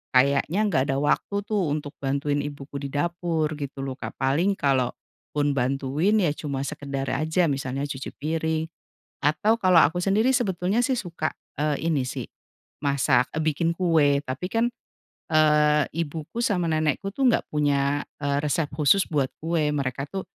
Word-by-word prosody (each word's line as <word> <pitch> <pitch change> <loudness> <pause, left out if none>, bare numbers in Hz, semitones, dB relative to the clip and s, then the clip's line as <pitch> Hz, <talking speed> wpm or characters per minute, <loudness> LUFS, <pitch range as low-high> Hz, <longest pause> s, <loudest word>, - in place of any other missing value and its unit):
kayaknya 140 +7 +3
nggak 155 -10 +2
ada 135 - +1
waktu 150 +7 0
tuh 205 -5 0
untuk 145 -1 -3
bantuin 140 +1 0
ibuku 145 -1 -6
di 140 - -3
dapur 165 0 -1
gitu 140 -1 -5
loh 135 -1 -4
Kak, - - -6
paling 155 +9 +2
kalaupun 140 +2 -1
bantuin, 140 +9 +1
ya 175 -7 +2
cuma 140 -3 -3
sekedar 135 -1 -4
aja 160 +6 +1
misalnya 135 0 -2
cuci 135 -2 -5
piring. 160 +1 -1 0.6
Atau 180 +10 +3
kalau 185 -2 +6
aku 160 +4 +2
sendiri 210 +7 +3
sebetulnya 205 -3 +1
sih 265 - +1
suka, 170 -6 -3 0.3
eee, 150 +1 0
ini 145 -5 +1
sih, - - -4 0.6
masak, 135 -3 +3
eee, 155 - 0
bikin 160 +2 +1
kue 160 -6 +3
tapi 135 +5 -4
kan, 230 +1 +2 0.7
eee, 150 -1 +4
ibuku 165 +5 -4
sama 195 -7 +1
nenekku 155 +5 0
tuh 270 +2 +2
nggak 235 - +1
punya, 145 -1 +1 0.2
eee, 140 0 +1
resep 150 +1 0
khusus 160 +6 +4
buat 140 -4 +2 0.2
kue, 160 -2 +1
mereka 135 0 -2
tuh 190 -1 -4
150 Hz, 155 wpm, -25 LUFS, 140-170 Hz, 0.7 s, kalau